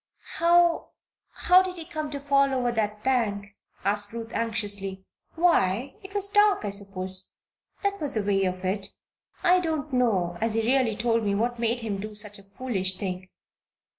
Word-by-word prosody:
"How 340 0 +3 0.4
how 365 +1 +5
did 370 -1 -4
he 330 - -7
come 310 -3 -4
to 285 -1 -4
fall 275 -1 +3
over 245 -2 +1
that 210 -2 -2
bank?" 205 -6 0 0.3
asked 205 0 +1
Ruth, 230 0 -6
anxiously. 205 -4 -2 0.3
"Why 270 - +2
it 390 +1 -12
was 400 -1 0
dark, 415 - +3
I 205 - -2
suppose. 190 -2 -3 0.5
That 400 0 0
was 285 -4 -2
the 215 - 0
way 195 -1 +2
of 185 0 -3
it. 195 +1 -1 0.6
I 365 0 +5
don't 315 -4 -3
know 190 -9 +1
as 225 -1 0
he 225 - +1
really 245 -2 +2
told 230 0 +1
me 200 -1 +1
what 240 +3 -1
made 235 +1 0
him 210 -3 -3
do 210 +1 -6
such 210 -1 0
a - - -15
foolish 190 -8 -1
thing. 185 -1 -5
225 Hz, 175 wpm, -26 LUFS, 200-280 Hz, 0.6 s, how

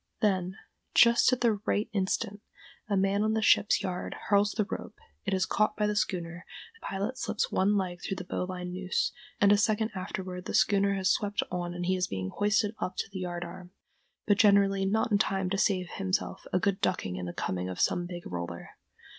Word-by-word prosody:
Then, 190 -4 +1 0.4
just 235 +2 +6
at 255 - 0
the 225 -4 +2
right 210 +2 +1
instant, 200 +1 -1 0.5
a 200 - +2
man 195 +1 +2
on 215 +1 +2
the 220 - +1
ship's 205 -1 +4
yard 185 -2 -3
hurls 205 0 +4
the 215 - 0
rope, - - -6 0.3
it - - 0
is 185 -1 +1
caught 215 +1 +1
by 210 - +2
the 210 0 0
schooner, 175 -3 -2 0.3
the 455 - -22
pilot 200 +7 -3
slips - - -1
one 200 +2 +2
leg 180 -2 -2
through 195 - -3
the 180 - -6
bowline 180 0 -4
noose, 185 0 -1 0.3
and 200 0 +5
a 205 - +6
second 215 +1 +1
afterward 185 -1 -5
the - - -3
schooner 200 -2 +3
has 190 -1 +2
swept 205 -1 0
on 175 -1 -3
and 175 0 -3
he 185 +1 +2
is 180 -1 0
being 95 -1 -3
hoisted 205 +1 +1
up 185 - -3
to - - -3
the 190 - -5
yard 175 -1 -3
arm, 180 +1 -10 0.5
but 205 -1 +3
generally 200 -2 +5
not 220 +3 +1
in 205 - +4
time 190 -3 0
to 195 - +1
save 185 -3 +1
himself 190 0 -2
a - - +2
good 195 +2 0
ducking 95 - 0
in 90 -1 -4
the - - -3
coaming 90 +1 -3
of 90 - -6
some 175 0 +1
big 175 -1 -7
roller. 85 -1 -6
195 Hz, 210 wpm, -29 LUFS, 180-205 Hz, 0.5 s, just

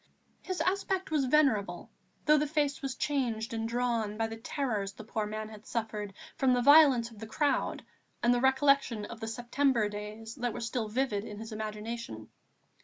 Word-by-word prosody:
His 370 -1 -3
aspect 380 -1 0
was 295 -4 +2
venerable, 230 - +2 0.3
though 300 0 +6
the 300 - 0
face 290 -2 0
was 270 -2 -3
changed 235 -6 -1
and 225 0 -2
drawn 235 -3 0
by 225 - +1
the 225 0 -5
terrors 225 -4 -2
the 220 - -10
poor 215 0 -2
man 215 0 -5
had 215 0 -12
suffered 210 -3 -3 0.2
from 260 -2 +3
the 245 - +2
violence 280 -5 +7
of 220 - -14
the 220 - -7
crowd 280 +4 0 0.4
and 240 +1 +5
the 245 - +1
recollection 265 -4 +3
of 230 +1 -9
the 225 - -5
September 245 0 +1
days 210 +2 -7
that 245 -2 -1
were - - -5
still 230 -1 -2
vivid 215 -2 0
in 210 -2 -8
his 225 +1 -7
imagination. 215 - -5
230 Hz, 180 wpm, -30 LUFS, 215-270 Hz, 0.4 s, violence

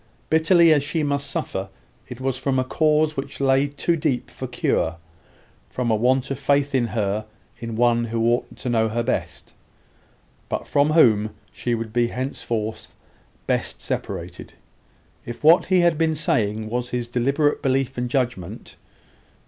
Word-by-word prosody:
Bitterly 160 +1 +5
as 145 - +3
she 155 +2 -2
must 140 -1 -1
suffer, 95 -7 -3 0.4
it 125 -1 -8
was 130 -1 -1
from 135 +1 -1
a 130 - +2
cause 155 +3 +2
which 140 0 -6
lay 135 +1 +3
too 145 +4 -1
deep 140 -5 -1
for - - -6
cure 80 +1 0 0.7
from 125 -2 -1
a - - +4
want 130 +4 +1
of 135 - -3
faith 140 +1 +1
in 125 -3 +2
her 105 -1 -2 0.3
in 115 -1 -5
one 120 0 +3
who 115 0 -1
ought 120 +1 0
to - - -7
know 110 -2 +2
her 120 +2 -1
best, - - -3 1.0
but - - -3
from 145 +2 +2
whom 110 -9 +4 0.2
she 120 -1 -1
would 115 -1 -5
be 120 0 +2
henceforth 115 -4 -4 0.5
best - - -1
separated, - - -5 0.7
if 120 +4 -8
what 165 +3 +6
he 185 -1 +3
had 170 -2 +2
been 160 -1 +2
saying 110 -8 0
was 125 +2 -3
his 120 -1 -3
deliberate 140 +5 +1
belief 135 -1 0
and 125 0 -2
judgment. 120 -9 -3
130 Hz, 160 wpm, -23 LUFS, 115-145 Hz, 1.0 s, what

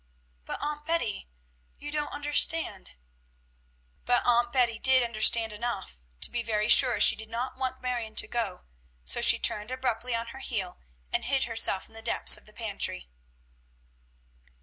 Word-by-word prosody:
"But, - - -6
Aunt 295 0 -4
Betty, 240 - -3 0.5
you 295 - -9
don't 300 -1 -3
understand." 295 - -2 1.1
But 245 0 0
Aunt 240 0 +2
Betty 240 -3 0
did 260 -1 +5
understand 225 -1 +3
enough 210 - -6 0.2
to - - +3
be 240 - -3
very 215 -2 -2
sure 250 -1 +6
she - - +6
did 220 0 -9
not 240 +3 -5
want 260 0 -5
Marion 240 -3 -5
to - - +1
go, 225 -6 -4 0.4
so 65 - +3
she - - +8
turned 210 +2 -1
abruptly 250 -2 -3
on 230 0 -5
her 265 - -11
heel, 195 -9 -5 0.3
and - - -1
hid 265 +1 0
herself 225 -4 0
in - - -23
the 225 - -10
depths 230 - +4
of - - -11
the 215 - -17
pantry. 200 - -3
235 Hz, 160 wpm, -27 LUFS, 220-260 Hz, 1.1 s, she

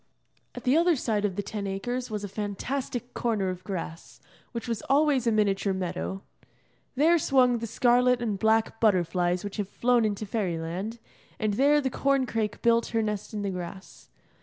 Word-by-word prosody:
At - - -7
the 255 +1 +3
other 340 +1 +4
side 215 -5 0
of 195 -3 -1
the 205 - -2
Ten 205 -1 -4
Acres 245 +6 -3
was 210 -2 -4
a - - -3
fantastic 240 +5 -4
corner 215 -5 0
of 185 0 -5
grass, 165 -4 -6 0.3
which 235 -1 -5
was 230 -3 -2
always 275 -3 +3
a - - +4
miniature 200 -2 +1
meadow. 190 +1 -4 0.7
There 325 +5 +4
swung 250 -4 +3
the 230 - -4
scarlet 245 +2 +3
and 215 -5 -2
black 220 +1 +2
butterflies 180 -3 +2
which 205 +1 -6
have 205 -2 -2
flown 245 +1 +2
into 215 0 -1
Fairyland, 190 +1 -3 0.4
and 215 -2 0
there 285 +6 +4
the 265 -2 -1
corn 275 -1 +1
crake 220 -3 -3
built 235 -1 +3
her 225 -1 0
nest 210 -2 -3
in 205 - -2
the 200 - -1
grass. 180 +1 -8
220 Hz, 180 wpm, -27 LUFS, 195-245 Hz, 0.7 s, other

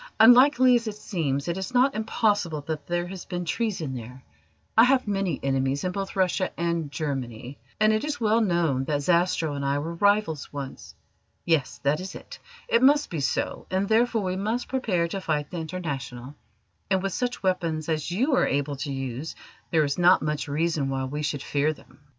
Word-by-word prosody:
Unlikely 255 +3 +7
as 235 -1 +2
it 215 - -3
seems, 150 -9 -2
it 170 +2 -2
is 190 +7 -5
not 260 +2 +4
impossible 205 -7 0
that 150 -1 -5
there 175 0 -1
has 185 0 -7
been 175 -1 -4
treason 175 - -2
there. 125 +1 -8 0.5
I 225 - +8
have 255 -2 +2
many 195 -6 -1
enemies 135 0 0
in 185 - -1
both 195 +1 -4
Russia 185 0 +1
and 170 -3 -1
Germany, 135 -4 -4 0.2
and 215 0 +4
it 215 - 0
is 295 -2 -3
well 225 0 +3
known 170 - +1
that 145 -1 -1
Zastrow 170 -2 +2
and 140 - -4
I 140 +1 +1
were 160 +4 -3
rivals 200 -4 +1
once. 140 -2 -8 0.5
Yes, 160 -6 +1
that 140 +2 +2
is 185 +1 -7
it: - - -10 0.3
it 230 - +3
must 290 +3 +4
be 165 - -2
so, 135 - -2
and 190 +1 0
therefore 225 0 +2
we 185 -1 -1
must 220 +6 -2
prepare 205 -10 0
to 195 +3 -4
fight 150 -4 -2
the 180 - -5
International; 140 -7 -5 0.6
and 190 -1 +1
with 195 -2 -2
such 245 -3 -2
weapons 170 -5 -1
as 155 -1 -1
you 250 - +1
are - - +3
able 145 0 -1
to 145 +1 -4
use 135 +2 -4 0.3
there 160 -2 +3
is 140 +3 -1
not 175 0 +5
much 150 -1 -2
reason 150 -1 0
why 135 0 -2
we 145 +3 -4
should 145 -2 -2
fear 145 +2 0
them." - - -20
170 Hz, 195 wpm, -26 LUFS, 145-205 Hz, 0.6 s, I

